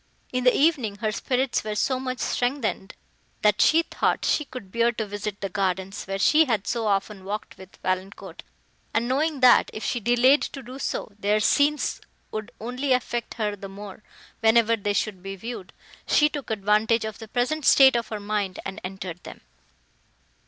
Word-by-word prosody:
In 255 0 -1
the 250 - +5
evening, 275 -9 +2
her 215 +1 -2
spirits 255 +4 -1
were 215 -1 -3
so 255 +5 0
much 255 -1 -3
strengthened, 245 -7 -2 0.5
that 210 -1 +4
she 325 +1 +5
thought - - -1
she 300 - +1
could 250 -8 -10
bear 235 +2 +2
to 220 -1 -3
visit 205 0 -5
the 195 - -1
gardens, 190 0 -2
where 195 0 -3
she 310 +10 +5
had 225 -7 -1
so 230 -2 -1
often 195 0 -1
walked 205 +2 -5
with 190 0 -14
Valancourt; 185 -1 -4 0.5
and, 230 +1 +1
knowing, 285 +2 0
that, 250 -1 +6
if 215 - -5
she 245 - -1
delayed 245 +5 +4
to 270 - -5
do 255 +3 -9
so, 225 - -3
their 210 +1 +2
scenes 290 +7 +2 0.3
would 215 -1 -5
only 250 +4 -1
affect 240 -1 -2
her 210 -3 -1
the 195 -1 -9
more, 200 +1 -10 0.4
whenever 230 0 +4
they 205 -1 -2
should 200 -2 -2
be 195 +1 -6
viewed, 225 -1 -7 0.4
she 300 0 +4
took 290 -5 -6
advantage 215 +2 +2
of 220 -1 -6
the 225 - -9
present 255 +7 -1
state 265 -2 +7
of 235 -1 0
her 215 - -5
mind, 205 -2 -2
and 195 +2 -6
entered 185 -2 -6
them. - - -11
220 Hz, 180 wpm, -25 LUFS, 200-255 Hz, 0.5 s, state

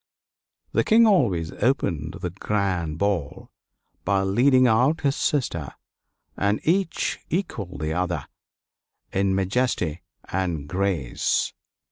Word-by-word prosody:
The - - +2
King 230 +1 +5
always 105 - +2
opened 85 - -1
the 90 - -3
grand 90 -5 -1
ball 95 -6 -2 0.5
by 100 -1 +1
leading 130 +7 +4
out 125 +7 +3
his 140 -2 +1
sister, 85 - -1 0.6
and 100 +2 +1
each 180 +2 0
equaled 115 - -3
the 80 0 -1
other 90 0 -1 0.9
in 95 0 +1
majesty 95 -5 0 0.3
and 85 -6 -2
grace. 90 -8 0
95 Hz, 105 wpm, -24 LUFS, 85-125 Hz, 0.9 s, King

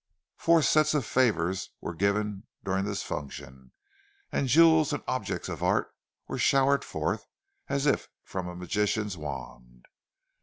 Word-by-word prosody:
Four 165 -1 +4
sets 155 +1 +4
of 140 -6 +1
favours 95 -9 +1
were - - -5
given 100 +2 -1 0.2
during 95 0 0
this 105 -1 -3
function, 65 -3 -7 0.6
and 135 - 0
jewels 160 +1 +5
and 145 - -3
objects 130 - -2
of - - -5
art - - +1 0.3
were - - -4
showered 140 +1 +3
forth - - -3 0.4
as 140 0 0
if 145 - +1
from 95 -2 -5
a 90 - -7
magician's 105 +2 -1
wand. 60 -5 -8
105 Hz, 140 wpm, -28 LUFS, 85-140 Hz, 0.6 s, jewels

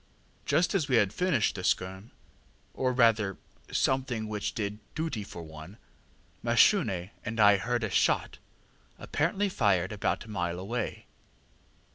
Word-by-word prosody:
Just 170 - +2
as 165 -7 0
we 130 - +3
had 105 -4 +3
finished 180 -11 +1
the 95 - -6
skerm, 95 +4 -1 0.6
or 130 -1 0
rather 115 -6 +3 0.3
something 130 -4 0
which 105 -1 -3
did 105 -1 -3 0.2
duty 155 -9 -2
for 85 -4 -9
one, 80 +5 -11 0.6
Mashune 115 - +3
and 115 +1 -4
I 105 -1 +7
heard 120 +3 -1
a 110 - -1
shot - - +1 0.6
apparently 190 +7 0
fired 95 - +1
about 105 +1 -1
a - - -15
mile 85 -5 -2
away. 110 +6 -4
110 Hz, 135 wpm, -29 LUFS, 95-130 Hz, 0.6 s, I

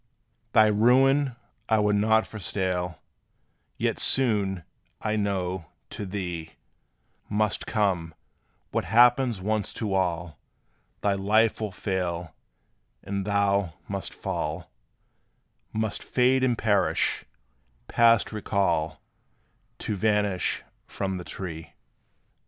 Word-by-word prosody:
Thy 110 - +7
ruin 130 +5 +4 0.3
I 110 - +4
would 105 -1 +2
not 110 +2 +3
forestall; 90 -4 -3 0.7
Yet - - 0
soon, 100 -8 +2 0.4
I 110 0 -1
know, 95 -4 -2 0.2
to 100 - -5
thee 90 -4 -5 0.8
Must 105 0 0
come, 90 -7 0 0.6
what - - -1
happens 120 -2 +4
once 110 +1 -1
to 105 -3 -3
all: 85 -4 -1 0.6
Thy 100 - +2
life 110 +4 +2
will 105 -2 -2
fail, 90 -3 -3 0.7
and 100 -1 -3
thou 100 -4 +1
must 100 -1 -4
fall - - -4 1.0
Must 110 -1 -2
fade 130 +1 +2
and 125 -3 +2
perish, 100 -4 +1 0.6
past 115 -2 +4
recall, 85 -7 -1 0.7
To 105 - -3
vanish 105 -2 0 0.2
from 95 -1 -3
the 90 - -6
tree. 85 -4 -6
100 Hz, 100 wpm, -26 LUFS, 90-110 Hz, 1.0 s, Thy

